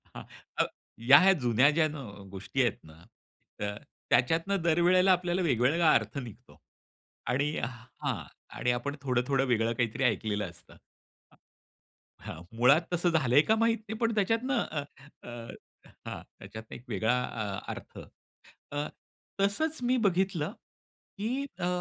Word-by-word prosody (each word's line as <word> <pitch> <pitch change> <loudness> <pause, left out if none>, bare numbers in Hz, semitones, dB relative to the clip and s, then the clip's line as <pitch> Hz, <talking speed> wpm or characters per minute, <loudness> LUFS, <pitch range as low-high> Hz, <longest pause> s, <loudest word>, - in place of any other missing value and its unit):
हां. - - -7 0.4
अ, - - +5 0.5
या 185 +7 +9
जुन्या 125 +3 +4
ज्या 155 +1 +3
न - - -6 0.3
गोष्टी 100 +7 -2
आहेत 120 -4 +1
ना 80 +1 -16 0.6
तर 105 0 -3 0.3
त्याच्यातनं 165 +9 +2
दर 165 0 +2
वेळेला 185 +2 +5
आपल्याला 180 0 +1
वेगवेगळा 155 +2 +3
अर्थ - - 0
निघतो 120 -6 -9 0.7
आणि 140 +4 +1
हां 120 -1 -5 0.3
आणि 125 - +1
आपण 125 +4 -2
थोडं-थोडं 130 +1 +1
वेगळं 115 -1 +2
काहीतरी 120 +3 -1
ऐकलेलं 105 -4 0
असतं 85 - -16 1.4
हां. 80 - -8 0.2
मुळात 135 +7 +6
तसं 175 0 +2
झालंय 145 -4 +4
का 220 +8 +2
माहित 230 +1 +2
नाही 220 - -4
पण 230 -1 +1
त्याच्यातनं 230 +5 +1
अ, 150 -2 -4 1.2
हां - - -5 0.2
त्याच्यात 110 0 -10
एक 120 - -9
वेगळा 115 +2 +1
अ 110 - -4 0.3
अर्थ. - - -11 1.4
तसंच 310 +11 +1
मी 250 +1 +2
बघितलं 185 -2 0 0.6
की 210 +3 -2 0.3
अ, 175 - 0
145 Hz, 130 wpm, -29 LUFS, 120-185 Hz, 1.4 s, या